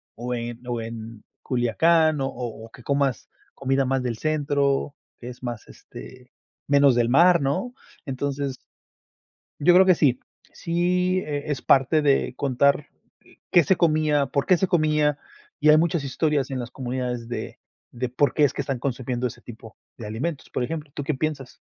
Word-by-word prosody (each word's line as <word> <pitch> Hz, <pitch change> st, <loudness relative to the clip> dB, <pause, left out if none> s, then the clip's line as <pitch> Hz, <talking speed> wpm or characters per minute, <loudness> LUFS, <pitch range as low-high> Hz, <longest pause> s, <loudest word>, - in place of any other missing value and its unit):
o 125 Hz, +2 st, -4 dB
en 120 Hz, 0 st, -5 dB
o 120 Hz, -1 st, -2 dB
en 115 Hz, -1 st, -8 dB, 0.2 s
Culiacán 150 Hz, +5 st, +2 dB
o 135 Hz, -, 0 dB
o 115 Hz, -3 st, -6 dB
o -, -, -15 dB
que 125 Hz, -, -15 dB
comas 140 Hz, -2 st, -1 dB, 0.3 s
comida 135 Hz, 0 st, 0 dB
más 135 Hz, 0 st, 0 dB
del 120 Hz, -3 st, -3 dB
centro, 145 Hz, -2 st, 0 dB, 0.2 s
que 120 Hz, -, -9 dB
es 125 Hz, -, -11 dB
más, 120 Hz, -3 st, -6 dB
este, 125 Hz, -, -13 dB, 0.4 s
menos 140 Hz, -2 st, +5 dB
del 120 Hz, -1 st, +2 dB
mar, 170 Hz, +4 st, +5 dB
¿no? 185 Hz, -, -1 dB, 0.3 s
Entonces, 140 Hz, 0 st, -3 dB, 1.0 s
yo 175 Hz, +5 st, +5 dB
creo 190 Hz, +1 st, +7 dB
que 185 Hz, -2 st, +5 dB
sí. 130 Hz, -5 st, +2 dB, 0.3 s
Sí, 180 Hz, +2 st, 0 dB
eh 145 Hz, -4 st, -4 dB
es 135 Hz, -, -3 dB
parte 135 Hz, +4 st, +3 dB
de 140 Hz, -3 st, +2 dB
contar, 140 Hz, +2 st, +1 dB, 0.4 s
eh, -, -, -22 dB
¿qué 175 Hz, -, +6 dB
se 190 Hz, -, +3 dB
comía, 155 Hz, -3 st, +2 dB
por 140 Hz, +1 st, -1 dB
qué 185 Hz, -, +5 dB
se 190 Hz, -, 0 dB
comía? 150 Hz, -4 st, +2 dB, 0.4 s
Y 150 Hz, -, +5 dB
hay 150 Hz, -, +7 dB
muchas 170 Hz, -2 st, +1 dB
historias 140 Hz, 0 st, -1 dB
en 130 Hz, -, -3 dB
las 120 Hz, 0 st, -5 dB
comunidades 125 Hz, -2 st, -4 dB
de 120 Hz, -, -6 dB, 0.3 s
de, 125 Hz, +1 st, -3 dB
¿por 140 Hz, +3 st, +1 dB
qué 150 Hz, -, +2 dB
es 140 Hz, -, +4 dB
que -, -, -10 dB
están 135 Hz, -3 st, -3 dB
consumiendo 125 Hz, -1 st, -3 dB
ese 120 Hz, 0 st, -11 dB
tipo 110 Hz, -2 st, -12 dB, 0.2 s
de 115 Hz, -, -8 dB
alimentos?, 135 Hz, +8 st, -4 dB
por 125 Hz, -, -2 dB
ejemplo, 155 Hz, -1 st, -6 dB
¿tú 145 Hz, -, -5 dB
qué 155 Hz, -, 0 dB
piensas? 135 Hz, -3 st, -4 dB
140 Hz, 180 wpm, -24 LUFS, 125-155 Hz, 1.0 s, creo